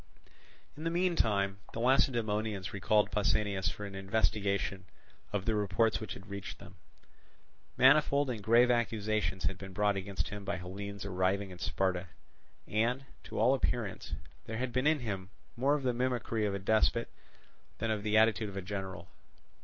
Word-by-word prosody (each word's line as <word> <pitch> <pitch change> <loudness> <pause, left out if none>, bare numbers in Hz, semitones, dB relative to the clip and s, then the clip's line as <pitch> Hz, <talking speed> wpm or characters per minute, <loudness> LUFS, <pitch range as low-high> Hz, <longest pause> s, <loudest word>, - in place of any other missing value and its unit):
In 155 - -8
the 165 - +1
meantime 110 - +1
the - - -4
Lacedaemonians 110 -6 +1
recalled 105 +1 +2
Pausanias 100 -1 +1
for 105 - -6
an 100 - -7
investigation 100 -1 0 0.5
of 100 -2 -2
the 115 - +1
reports 105 +2 +2
which 110 - -5
had 95 - -11
reached 100 -1 -6
them. - - -13 1.0
Manifold 145 -2 +5
and 110 -4 -5
grave 120 +4 +5
accusations 110 -5 0
had 95 0 -1
been 95 -1 -8
brought 105 +1 +2
against 100 0 -3
him 105 -1 -6
by 100 +1 -2
Hellenes 100 +2 -6
arriving 95 +1 0
in 90 - -10
Sparta; 95 +1 -1 0.6
and, 120 +5 0 0.2
to - - -7
all 115 +5 +5
appearance, 120 -6 -2 0.3
there 110 - -4
had 125 0 -2
been 130 +3 +2
in 155 -2 +3
him 100 -5 -4 0.3
more 135 +4 +3
of 145 - -3
the 125 -1 +1
mimicry 120 -3 0
of 100 - -1
a - - 0
despot 110 +4 +2 0.7
than 115 0 -1
of 105 -2 -1
the 105 +1 +2
attitude 110 -1 +4
of 100 - -8
a - - -2
general. 95 0 -5
105 Hz, 165 wpm, -32 LUFS, 100-115 Hz, 1.0 s, Manifold